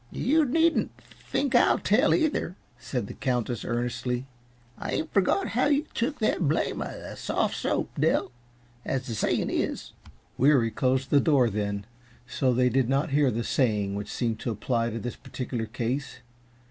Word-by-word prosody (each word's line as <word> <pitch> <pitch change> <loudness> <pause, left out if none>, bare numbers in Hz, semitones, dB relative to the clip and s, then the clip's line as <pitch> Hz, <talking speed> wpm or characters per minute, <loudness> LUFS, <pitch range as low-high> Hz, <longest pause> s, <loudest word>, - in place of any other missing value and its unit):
"You 305 +5 +2
needn't 325 +5 +2
think 275 -2 -4
I'll 240 - +5
tell, 250 +8 +3
either," 305 - 0 0.2
said 120 -1 -3
the - - -8
Countess, 120 -2 -2
earnestly. 120 +1 -2 0.5
"I - - -4
ain't 160 - -2
forgot 200 - +2
how 250 +4 +2
you 290 +1 +2
took 270 +6 -1
the 215 - +1
blame 155 -2 0
uh - - -2
that - - -8
sof' - - 0
soap, - - -1
Dell. - - +2 0.5
As 135 -1 -2
the 120 - -4
sayin' 110 - 0
is - - -2 0.2
" - - -35
Weary 130 -4 +4
closed 130 +3 0
the 145 - +6
door 135 -7 +3
then, 100 -1 -2 0.4
so 130 +1 0
they 125 +1 +3
did 125 0 +1
not 135 +1 +1
hear 145 -1 +3
the 115 0 -2
saying 105 -8 +1
which 100 +1 -5
seemed 115 -3 -1
to - - -3
apply 115 +2 -1
to 115 - -4
this 120 +2 -5
particular 120 -3 -5
case. 120 +4 -3
130 Hz, 170 wpm, -27 LUFS, 115-160 Hz, 0.5 s, the